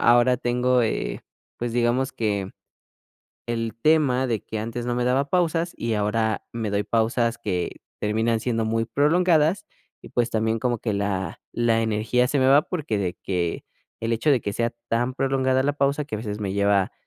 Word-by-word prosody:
ahora 120 Hz, +1 st, +5 dB
tengo, 125 Hz, 0 st, +2 dB
eh, 110 Hz, -, -2 dB, 0.4 s
pues 120 Hz, -1 st, -3 dB
digamos 120 Hz, +3 st, +1 dB
que 100 Hz, -4 st, -2 dB, 0.9 s
el 115 Hz, -2 st, -2 dB
tema 140 Hz, -5 st, +3 dB
de 115 Hz, -4 st, -1 dB
que 110 Hz, -, -5 dB
antes 115 Hz, +2 st, -4 dB
no 120 Hz, -, 0 dB
me 125 Hz, -, 0 dB
daba 135 Hz, +3 st, +1 dB
pausas 170 Hz, -1 st, +1 dB
y 115 Hz, -1 st, -1 dB
ahora 110 Hz, +1 st, 0 dB
me 110 Hz, -3 st, -3 dB
doy 100 Hz, 0 st, +1 dB
pausas 115 Hz, +2 st, +1 dB
que 95 Hz, -6 st, -3 dB, 0.2 s
terminan 110 Hz, +2 st, +1 dB
siendo 115 Hz, -1 st, -1 dB
muy 115 Hz, +1 st, 0 dB
prolongadas, 160 Hz, -, +3 dB, 0.4 s
y -, -, -10 dB
pues 120 Hz, -1 st, 0 dB
también 110 Hz, +1 st, 0 dB
como 120 Hz, -2 st, 0 dB
que 110 Hz, -1 st, -2 dB
la 95 Hz, -4 st, -2 dB
la 115 Hz, -1 st, +2 dB
energía 115 Hz, +3 st, +1 dB
se 145 Hz, -, +1 dB
me 130 Hz, -, +3 dB
va 145 Hz, +2 st, +6 dB
porque 150 Hz, -, -3 dB
de 90 Hz, -3 st, -1 dB
que 90 Hz, -3 st, -2 dB, 0.4 s
el 115 Hz, +1 st, -1 dB
hecho 115 Hz, +7 st, +1 dB
de 130 Hz, -5 st, +4 dB
que 100 Hz, -, -2 dB
sea 115 Hz, 0 st, 0 dB, 0.2 s
tan 120 Hz, +2 st, 0 dB
prolongada 130 Hz, -1 st, +1 dB
la 145 Hz, -, +1 dB
pausa, 140 Hz, +1 st, +1 dB
que 140 Hz, -, -4 dB
a -, -, -5 dB
veces 105 Hz, -2 st, -4 dB
me 100 Hz, -2 st, -2 dB
lleva 100 Hz, -1 st, +2 dB
115 Hz, 185 wpm, -24 LUFS, 110-130 Hz, 0.9 s, va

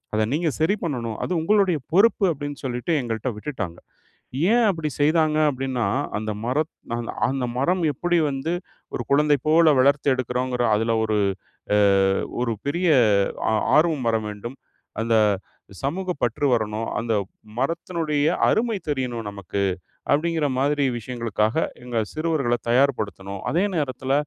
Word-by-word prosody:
அத 110 Hz, 0 st, +2 dB
நீங்க 160 Hz, +1 st, +1 dB
சரி 190 Hz, +6 st, +3 dB
பண்ணணும், 115 Hz, -7 st, -3 dB
அது -, -, -6 dB
உங்களுடைய 195 Hz, -2 st, +3 dB, 0.2 s
பொறுப்பு." 205 Hz, +1 st, +4 dB
அப்படின்னு 145 Hz, 0 st, -6 dB
சொல்லிட்டு 125 Hz, +6 st, -2 dB
எங்கள்ட்ட 115 Hz, +1 st, -3 dB
விட்டுட்டாங்க. 105 Hz, -, -5 dB, 0.7 s
ஏன் 240 Hz, 0 st, +4 dB
அப்டி 160 Hz, -5 st, -1 dB
செய்தாங்க 155 Hz, 0 st, +3 dB
அப்டின்னா, 130 Hz, -4 st, -2 dB, 0.3 s
அந்த 110 Hz, 0 st, -3 dB
மரத் 150 Hz, +6 st, 0 dB, 0.2 s
அந்த் 120 Hz, -1 st, -4 dB, 0.2 s
அந்த 135 Hz, -2 st, -1 dB
மரம் 175 Hz, +6 st, +1 dB
எப்படி 175 Hz, +5 st, 0 dB
வந்து 135 Hz, +4 st, -3 dB, 0.4 s
ஒரு -, -, -2 dB
குழந்தை 145 Hz, +1 st, +4 dB
போல 160 Hz, +1 st, +6 dB
வளர்த்து 140 Hz, +2 st, +3 dB
எடுக்குறோங்கிற 125 Hz, 0 st, -1 dB
அதில 115 Hz, +2 st, 0 dB
ஒரு 110 Hz, -1 st, 0 dB, 0.6 s
அ -, -, +4 dB, 0.6 s
ஒரு 120 Hz, -1 st, 0 dB
பெரிய 175 Hz, +5 st, 0 dB, 0.6 s
ஆ -, -, +2 dB, 0.2 s
ஆர்வம் 155 Hz, -3 st, +3 dB
வர 115 Hz, -, +2 dB
வேண்டும். 105 Hz, +5 st, -7 dB, 0.5 s
அந்த 115 Hz, 0 st, +1 dB, 0.7 s
சமூக 185 Hz, +7 st, -2 dB, 0.2 s
பற்று 120 Hz, +4 st, 0 dB
வரணும், 110 Hz, -1 st, -1 dB
அந்த 115 Hz, -1 st, -1 dB, 0.4 s
மரத்தினுடைய 155 Hz, +1 st, -1 dB, 0.2 s
அருமை 225 Hz, -2 st, +1 dB
தெரியணும் 125 Hz, -6 st, -2 dB
நமக்கு. 100 Hz, 0 st, -4 dB, 0.5 s
அப்டிங்கிற 160 Hz, 0 st, +1 dB
மாதிரி 145 Hz, +1 st, +1 dB
விஷயங்களுக்காக 115 Hz, 0 st, -2 dB, 0.3 s
எங்க 120 Hz, -2 st, -2 dB
சிறுவர்கள 155 Hz, -6 st, 0 dB
தயார்படுத்தணும். 105 Hz, -7 st, 0 dB
அதே 175 Hz, +5 st, +2 dB
நேரத்துல 135 Hz, -2 st, -2 dB
135 Hz, 130 wpm, -23 LUFS, 115-160 Hz, 0.7 s, போல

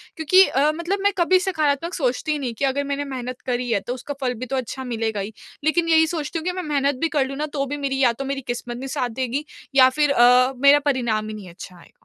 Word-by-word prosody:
क्योंकि 370 Hz, +4 st, +5 dB
अ, 285 Hz, +4 st, +2 dB
मतलब 345 Hz, +4 st, -2 dB
मैं 405 Hz, -, +4 dB
कभी 370 Hz, +2 st, +4 dB
सकारात्मक 330 Hz, -3 st, -1 dB
सोचती 265 Hz, +1 st, -1 dB
ही 300 Hz, -, -1 dB
नहीं 250 Hz, -4 st, -3 dB
कि 280 Hz, -, +2 dB
अगर 275 Hz, +1 st, 0 dB
मैंने 280 Hz, 0 st, -3 dB
मेहनत 255 Hz, -2 st, -6 dB
करी 250 Hz, -1 st, -2 dB
है 200 Hz, -, +2 dB
तो 245 Hz, -, -1 dB
उसका 260 Hz, +3 st, -6 dB
फल 250 Hz, -2 st, 0 dB
भी 255 Hz, -, -4 dB
तो 265 Hz, +2 st, -4 dB
अच्छा 260 Hz, +1 st, -4 dB
मिलेगा 225 Hz, -4 st, -2 dB
ही। 200 Hz, +3 st, -5 dB, 0.3 s
लेकिन 330 Hz, +2 st, +1 dB
यही 320 Hz, 0 st, +5 dB
सोचती 315 Hz, -1 st, -3 dB
हूँ 320 Hz, -, -9 dB
कि 360 Hz, -, +1 dB
मैं -, -, -8 dB
मेहनत 285 Hz, -2 st, 0 dB
भी 330 Hz, -, +1 dB
कर 270 Hz, -, +3 dB
लूँ 275 Hz, +1 st, -6 dB
ना 300 Hz, -, -1 dB
तो 275 Hz, -1 st, -1 dB
भी 290 Hz, +2 st, -4 dB
मेरी 275 Hz, -1 st, -2 dB
या 240 Hz, -, +4 dB
तो 275 Hz, +4 st, -6 dB
मेरी 275 Hz, 0 st, -3 dB
किस्मत 240 Hz, 0 st, -4 dB
नहीं 270 Hz, +2 st, -6 dB
साथ 260 Hz, -3 st, -2 dB
देगी, 260 Hz, +4 st, -3 dB, 0.3 s
या 260 Hz, -1 st, +7 dB
फिर 295 Hz, +1 st, +1 dB
अ, 250 Hz, +1 st, +5 dB
मेरा 280 Hz, +3 st, +6 dB
परिणाम 235 Hz, -6 st, 0 dB
ही 215 Hz, -, -6 dB
नहीं 195 Hz, -4 st, -10 dB
अच्छा 180 Hz, +1 st, -11 dB
आएगा। -, -, -18 dB
275 Hz, 265 wpm, -22 LUFS, 245-300 Hz, 0.3 s, या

